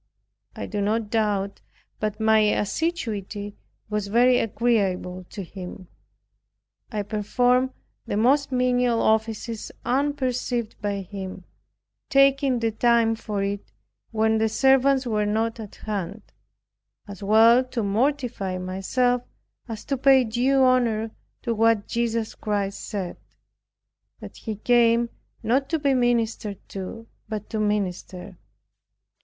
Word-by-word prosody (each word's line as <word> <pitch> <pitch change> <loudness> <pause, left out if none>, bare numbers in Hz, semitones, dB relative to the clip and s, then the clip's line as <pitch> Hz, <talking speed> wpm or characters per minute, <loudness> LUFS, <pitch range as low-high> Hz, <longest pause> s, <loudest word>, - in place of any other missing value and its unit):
I - - -5
do 205 -1 -3
not 215 +1 0
doubt 205 -3 0 0.4
but 215 0 -2
my 220 0 +4
assiduity 210 - -1 0.3
was 210 -1 -2
very 245 +4 +4
agreeable 195 -6 0
to 200 - -6
him. 185 0 -9 1.0
I 210 -2 -2
performed 245 +5 +1 0.4
the 205 - -1
most 275 +6 +3
menial 250 -2 +2
offices 220 0 0
unperceived 255 -4 -1
by 200 -1 -2
him 190 -1 -7 0.7
taking 275 -1 +4
the 230 -1 0
time 230 0 +3
for 210 -3 -3
it 200 0 -4 0.4
when 220 0 +2
the 220 0 +2
servants 270 +2 +3
were 210 -3 0
not 225 +2 0
at 215 -3 -8
hand; 200 -1 -5 0.8
as 200 0 -9
well 225 +5 +6
to 245 -3 -3
mortify 225 -3 0
myself 195 +7 0 0.5
as 225 -2 -7
to 275 - -1
pay 265 0 +5
due 250 +4 +2
honor 235 -4 +2 0.3
to 235 - 0
what 225 -1 +2
Jesus 230 -1 -1
Christ 200 -2 -2
said, 190 -4 -4 1.0
that - - -10
He 220 -2 -5
came 235 +1 +3 0.3
not 260 +5 +1
to 325 - +1
be 285 -2 +1
ministered 230 -4 0
to, 195 +4 -7 0.2
but 210 -1 -5
to 220 - -2
minister. 190 -3 -2
220 Hz, 120 wpm, -24 LUFS, 205-245 Hz, 1.0 s, well